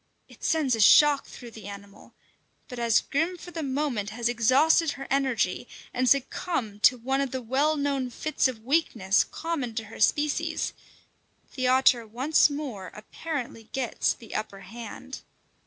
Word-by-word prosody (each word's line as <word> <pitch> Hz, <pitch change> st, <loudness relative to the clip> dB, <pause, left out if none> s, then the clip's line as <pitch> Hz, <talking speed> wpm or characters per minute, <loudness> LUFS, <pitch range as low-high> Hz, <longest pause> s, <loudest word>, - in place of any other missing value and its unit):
It -, -, -18 dB
sends 305 Hz, -6 st, +1 dB
a -, -, -6 dB
shock 290 Hz, +6 st, +6 dB
through 240 Hz, -2 st, -11 dB
the 220 Hz, -3 st, -11 dB
animal, 200 Hz, 0 st, -12 dB, 0.5 s
but 250 Hz, -4 st, -8 dB
as 230 Hz, -2 st, +3 dB
Grim 325 Hz, +5 st, -1 dB
for 355 Hz, -, -11 dB
the 330 Hz, -, -5 dB
moment 265 Hz, -7 st, -2 dB
has 235 Hz, +1 st, -2 dB
exhausted 260 Hz, +7 st, +3 dB
her 270 Hz, -, -8 dB
energy 255 Hz, -6 st, 0 dB, 0.3 s
and 255 Hz, 0 st, +1 dB
succumbed 260 Hz, -, -1 dB
to 250 Hz, +3 st, +5 dB
one 265 Hz, +3 st, -1 dB
of 275 Hz, -, -1 dB
the 260 Hz, -, -4 dB
well 285 Hz, +6 st, +1 dB
known 280 Hz, -3 st, -1 dB
fits 295 Hz, +4 st, 0 dB
of 230 Hz, -4 st, -7 dB
weakness 235 Hz, -9 st, +2 dB
common 285 Hz, -9 st, -4 dB
to 225 Hz, -, -2 dB
her 220 Hz, +1 st, -12 dB
species, 295 Hz, 0 st, +1 dB, 0.8 s
the 255 Hz, -1 st, -1 dB
otter 255 Hz, -2 st, +4 dB
once 260 Hz, +9 st, +3 dB
more 275 Hz, -10 st, -5 dB
apparently 240 Hz, 0 st, -6 dB
gets 260 Hz, -3 st, 0 dB
the 225 Hz, -, -13 dB
upper 205 Hz, -2 st, -4 dB
hand. 235 Hz, +6 st, -9 dB
255 Hz, 155 wpm, -26 LUFS, 225-285 Hz, 0.8 s, shock